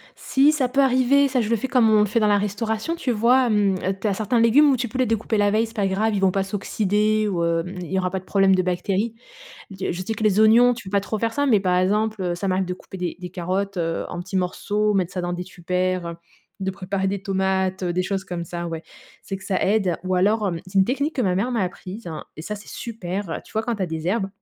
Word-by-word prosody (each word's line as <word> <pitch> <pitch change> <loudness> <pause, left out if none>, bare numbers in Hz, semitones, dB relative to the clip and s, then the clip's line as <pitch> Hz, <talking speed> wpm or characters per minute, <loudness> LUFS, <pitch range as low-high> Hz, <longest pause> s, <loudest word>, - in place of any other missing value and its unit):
Si 275 +3 +3
ça 275 -5 0
peut 275 +2 +2
arriver, 265 +2 +4
ça 255 -2 +1
je 220 - -2
le 230 - +3
fais 230 +4 -3
comme 250 -4 +4
on 215 -1 +5
le - - +4
fait 210 +3 0
dans 215 - +3
la 205 0 +4
restauration. 220 - -2
Tu 275 -7 -2
vois, 245 +3 +3
hem, 205 -3 +2 0.2
tu 215 - -1
as 200 - +1
certains 220 +4 0
légumes 250 +6 +6
où 260 - +2
tu 240 +1 -2
peux 250 - -6
les 255 - +3
découper 225 -1 0
la 205 0 +3
veille, 220 +2 +2
c'est 225 - -15
pas 200 -3 +1
grave, 215 +3 0
ils - - 0
vont 190 -1 +4
pas 195 0 0
s'oxyder 210 +2 0
ou, 175 -4 -1
hem, 170 +2 -1
il 175 - -7
y 190 - +1
aura 180 -1 0
pas 190 - -2
de 185 - -18
problème 195 0 +3
de 185 - +2
bactéries. 185 +5 -1 0.6
Du 190 -1 -3
je 180 +2 -4
sais 220 - -3
que 215 - -4
les 215 0 +3
oignons, 235 +3 +6
tu 230 -3 -10
peux - - -8
pas - - +4
trop 215 +2 -4
faire 225 +1 -1
ça, 285 +2 0
mais 220 -6 +4
par 180 -2 +1
exemple, 210 +3 +1
heu, 175 -1 -1
ça 195 +3 -3
m'arrive 185 0 +1
de 180 - -4
couper 190 - -11
des 180 -1 -3
des 180 -1 -7
carottes, 185 +2 -2
heu, 165 -1 -1
en 175 - -5
petits 190 +2 -5
morceaux, 205 +3 0
mettre 185 -2 0
ça 180 - -3
dans 175 0 -3
des 180 +1 -4
tupperwares, 180 0 -1
heu, 170 0 -5 0.5
de 190 0 -1
préparer 190 +1 -3
des 200 0 -3
tomates, 190 -1 0
heu, 175 - 0
des 180 +1 0
choses 190 0 -2
comme 175 -3 -5
ça, 170 +1 -5
ouais. 165 -1 -5 0.4
C'est 195 - -5
que 190 - -13
ça 190 -2 0
aide 195 -4 +1
ou 185 0 0
alors, 205 +3 +2
hem, 170 -3 -3
c'est 190 +1 -1
une 190 - +6
technique 280 +6 -1
que 255 - +1
ma 185 -4 +1
mère 210 +7 0
m'a 230 - +1
apprise 185 +2 -6 0.3
et 155 - -7
ça 210 - -4
c'est 205 - -13
super! 195 -5 -5
Tu - - -18
vois 220 - 0
quand 235 +1 -2
tu 195 - -3
as - - 0
des 160 -1 -5
herbes, 195 -1 0
195 Hz, 285 wpm, -23 LUFS, 185-220 Hz, 0.6 s, légumes